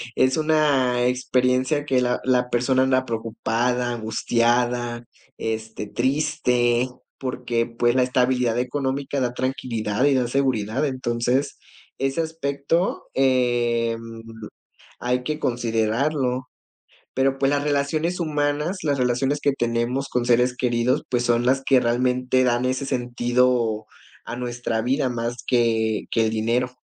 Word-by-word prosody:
es 130 +3 +3
una 140 -6 +2
experiencia 130 +3 +1
que 130 -3 +2
la 125 0 0
la 125 -1 +1
persona 130 +2 +2
anda 130 0 +2
preocupada, 120 +2 -1
angustiada, 120 +1 0 0.3
este, 110 -1 -4
triste, 125 -1 +1 0.3
porque, 125 -3 -1
pues, 120 +1 0
la 130 - +4
estabilidad 125 -2 +1
económica 135 +2 -2
da 125 -1 -1
tranquilidad 125 -3 -1
y 145 - +4
da 125 -2 +1
seguridad. 130 -1 0
Entonces, 130 0 -1 0.4
ese 135 +4 0
aspecto, 160 +2 -1
em, 120 -3 +1 1.0
hay 125 +1 0
que 150 +3 -3
considerarlo. 125 +2 0 0.7
Pero, 135 +1 +1
pues, 135 0 +3
las 145 0 0
relaciones 155 +5 0
humanas, 150 +3 -1
las 145 -3 +1
relaciones 130 +3 +1
que 145 - +2
tenemos 120 +2 -1
con 125 -2 -1
seres 125 +1 +2
queridos, 120 0 +1
pues, 120 -1 +1
son 120 0 +2
las 135 +2 +3
que 130 -2 +4
realmente 125 +1 +1
dan 120 0 +1
ese 130 +2 -1
sentido 120 -2 +1 0.4
a 120 - -6
nuestra 120 -2 -2
vida 130 +2 +1
más 120 0 -3
que 115 -3 +1
que 115 - +2
el 110 - 0
dinero. 115 +3 0
125 Hz, 125 wpm, -23 LUFS, 120-135 Hz, 1.0 s, la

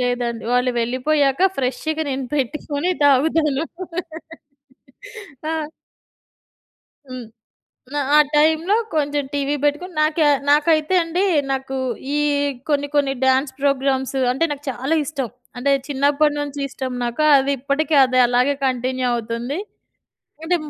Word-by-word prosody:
లేదండి. 245 -2 -1
వాళ్ళు 250 +1 +2
వెళ్ళిపోయాక 270 +4 +1 0.2
ఫ్రెష్‌గా 275 +5 -2
నేను 265 0 -3
పెట్టుకొని 290 +4 -2
తాగుతాను. 290 +1 +3 1.9
ఆ! 320 - -1 1.6
హ్మ్. 255 -2 -6 0.7
ఆ! - - +1 0.2
ఆ - - +8 0.2
టైంలో 320 +6 +3 0.2
కొంచెం 290 -1 0
టీవీ 285 0 0
పెట్టుకొని 300 +5 -1
నాకి 310 +1 +1 0.3
నాకైతే 310 +3 +3
అండి 340 +4 -1 0.3
నాకు 265 0 -3 0.4
ఈ - - +1 0.5
కొన్ని 285 -1 +1
కొన్ని 280 -2 +2
డ్యాన్స్ 265 +1 +2
ప్రోగ్రామ్స్ 270 -1 0 0.2
అంటే, 270 +6 +1
నాకు 290 0 -6
చాలా 265 +6 -1
ఇష్టం. 275 -5 -4 0.3
అంటే 275 +3 +1 0.2
చిన్నప్పడి 290 +2 +2
నుంచి 290 0 -5
ఇష్టం 260 -1 -5
నాకు 240 +5 -1
అది 270 +1 +1
ఇప్పటికి 290 +4 0
అది 255 -1 +1
అలాగే 250 +3 +2
కంటిన్యూ 255 0 -1
అవుతుంది. 235 +4 -3 0.9
అంటే 355 +2 +1
280 Hz, 115 wpm, -20 LUFS, 255-305 Hz, 1.9 s, ఆ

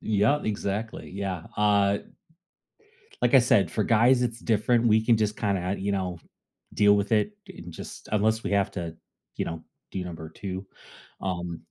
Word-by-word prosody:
Yeah, 110 +7 +2
exactly, 105 +1 -3
yeah, 95 -3 -4
uh 100 -1 +3 1.2
like 120 +1 +2
I 135 - +9
said, 115 - +3
for 110 - 0
guys 120 +4 +4
it's 120 -1 -1
different. 115 +2 +2
We 110 0 +4
can 115 -1 +4
just 105 -1 0
kinda, 95 -2 0
you 100 +1 -1
know, 90 -3 -2 0.6
deal 105 -1 +5
with 100 +2 -1
it 110 - +2 0.2
and 85 0 -10
just - - -9
unless 110 +1 +2
we - - -3
have 100 -1 +2
to, 85 -3 -5 0.4
you - - -1
know, 85 -1 -5 0.3
do 95 - -4
number 80 -3 -7
2, 95 +3 -6 0.6
um 90 -3 -3
100 Hz, 165 wpm, -27 LUFS, 95-110 Hz, 1.2 s, I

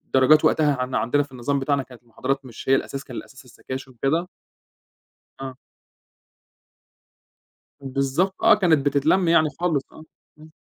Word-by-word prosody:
درجات 135 +4 +5
وقتها 150 -2 +3
عن 125 0 -3
عندنا 145 +5 +1
في 145 - -17
النظام 135 +3 -2
بتاعنا 140 0 0
كانت 125 -2 -16
المحاضرات 135 +4 -3
مش 120 +1 -9
هي 135 - +6
الأساس 135 0 -3
كان 125 -4 -9
الأساس 130 0 -11
السكاشن 130 +2 -8
وكده. 140 +8 -1 1.1
آه. 135 -1 -7 2.2
بالضبط 140 +7 -1
آه، 225 -1 +7
كانت 165 -8 +2
بتتلم 150 +6 +2
يعني 160 -2 +4
خالص 165 -6 0
آه، 155 - -13 0.4
إمم. 155 +1 -15
140 Hz, 140 wpm, -23 LUFS, 130-155 Hz, 2.2 s, آه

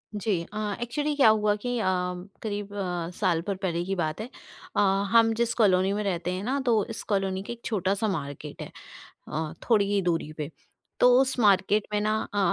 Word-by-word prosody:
जी, 205 +1 -1 0.2
अ, 210 -1 -2
actually 290 +5 -1
क्या 275 -6 +5
हुआ 210 -1 +3
कि 245 +3 -3
अ, - - -1 0.6
करीब 205 -2 -4
अ, 180 -4 -2
साल 175 -5 +1
भर 200 - 0
पहले 175 -3 -2
की 195 +1 -2
बात 160 +2 -2
है 235 - -6 0.5
अ, - - +2 0.3
हम 230 -1 +5
जिस 235 +1 0
कॉलोनी 190 -3 +3
में 210 +1 -1
रहते 180 -2 -1
हैं 185 +2 -4
ना 270 +4 0
तो 225 -4 +3
इस 225 - -5
कॉलोनी 195 -1 0
के 240 - -5
एक 235 - -14
छोटा-सा 200 +1 0
मार्केट 145 -4 -5
है - - -7 0.6
अ, 155 0 -3 0.2
थोड़ी 210 -3 +5
ही 200 - +2
दूरी 165 -3 -1
पे। 150 0 -4 0.5
तो 250 - +7
उस 265 -1 0
मार्केट 205 0 +4
में 210 - +2
ना 215 +1 +1 0.2
अ, 205 - 0
205 Hz, 200 wpm, -27 LUFS, 180-220 Hz, 0.6 s, तो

